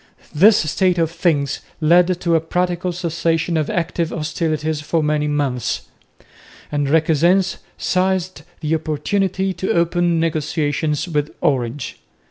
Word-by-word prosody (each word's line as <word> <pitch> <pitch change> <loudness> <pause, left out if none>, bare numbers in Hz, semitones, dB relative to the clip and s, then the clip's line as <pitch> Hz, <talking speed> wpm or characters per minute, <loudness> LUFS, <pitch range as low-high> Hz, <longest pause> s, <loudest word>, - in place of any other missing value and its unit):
This 205 +8 +6
state 185 -1 +2
of 165 -1 +1
things 155 -5 0 0.2
led 175 +3 +4
to 170 -1 +1
a 165 - +3
practical 180 +2 -1
cessation 170 -1 -1
of 155 -2 0
active 170 -1 -1
hostilities 155 -1 -2
for 155 +2 0
many 150 0 +1
months; 130 -5 -1 0.9
and 145 -1 0
Requesens 165 +5 +3 0.2
seized 185 -2 0 0.2
the 155 0 -1
opportunity 190 +5 -1
to 185 +2 -2
open 170 0 +2
negotiations 155 -1 -1
with 150 -3 -1
Orange. 130 -1 -1
165 Hz, 120 wpm, -20 LUFS, 150-175 Hz, 0.9 s, This